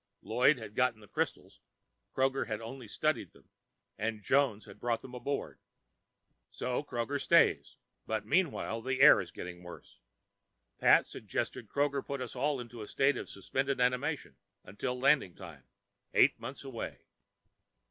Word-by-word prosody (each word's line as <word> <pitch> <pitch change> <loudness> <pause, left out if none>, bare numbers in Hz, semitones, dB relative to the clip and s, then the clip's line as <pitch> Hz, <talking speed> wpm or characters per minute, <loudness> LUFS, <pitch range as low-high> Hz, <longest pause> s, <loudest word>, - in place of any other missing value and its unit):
Lloyd 125 +7 +4
had 110 -3 -9
gotten 125 -2 +1
the 105 - -15
crystals, 105 - -3 0.6
Kroger 135 -2 +1
had 110 -2 -3
only 115 +1 -8
studied 140 - -1
them, - - -22 0.5
and 110 -1 -2
Jones 130 -6 +2
had 100 - -13
brought 120 -1 -1
them 125 - -10
aboard. 130 +3 -4 0.9
So 125 +1 -2
Kroger 135 +1 -2
stays, - - +3 0.3
but 110 0 -2
meanwhile 150 -10 0
the 130 +2 -2
air 145 -6 +9
is 90 - -8
getting 90 +2 -8
worse. 90 -1 -12 0.8
Pat - - +6
suggested - - -4
Kroger 140 -1 0
put 140 0 -4
us 130 -1 -6
all 140 +2 0
into 120 -1 -8
a 105 - -7
state 135 +1 +2
of - - -6
suspended 135 +7 -2
animation 125 +5 0 0.4
till 125 -1 -1
landing 135 - +3
time, 85 -8 -11 0.5
eight - - +5
months 135 +1 -7
away. 130 -4 -6
125 Hz, 145 wpm, -32 LUFS, 110-140 Hz, 0.9 s, air